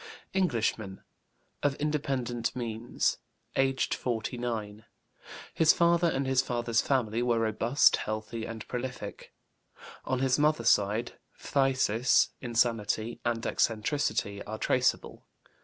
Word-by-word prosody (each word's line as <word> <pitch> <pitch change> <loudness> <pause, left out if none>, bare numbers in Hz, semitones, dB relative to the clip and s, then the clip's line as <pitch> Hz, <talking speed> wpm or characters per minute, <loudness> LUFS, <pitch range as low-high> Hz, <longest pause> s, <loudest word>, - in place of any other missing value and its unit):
Englishman, 115 - -1 0.6
of 145 -1 +1
independent 135 -6 -2
means, 120 -1 -2 0.4
aged 135 0 +1
49. 115 -3 -3 0.7
His 160 -1 +5
father 170 0 +3
and 135 -3 -1
his 130 -1 +3
father's 120 -3 0
family 120 -4 0
were 120 -1 +2
robust, 115 +4 +3
healthy, 110 +1 -4
and 110 -1 -7
prolific. 125 +1 -6 0.7
On 130 - -1
his 130 +1 +1
mother's 150 -6 +3
side, 105 +4 0 0.2
phthisis, 130 -4 +2
insanity, 115 -2 0
and 115 -1 -1
eccentricity 110 -3 0
are 110 +1 -5
traceable. - - 0
120 Hz, 105 wpm, -29 LUFS, 110-135 Hz, 0.7 s, His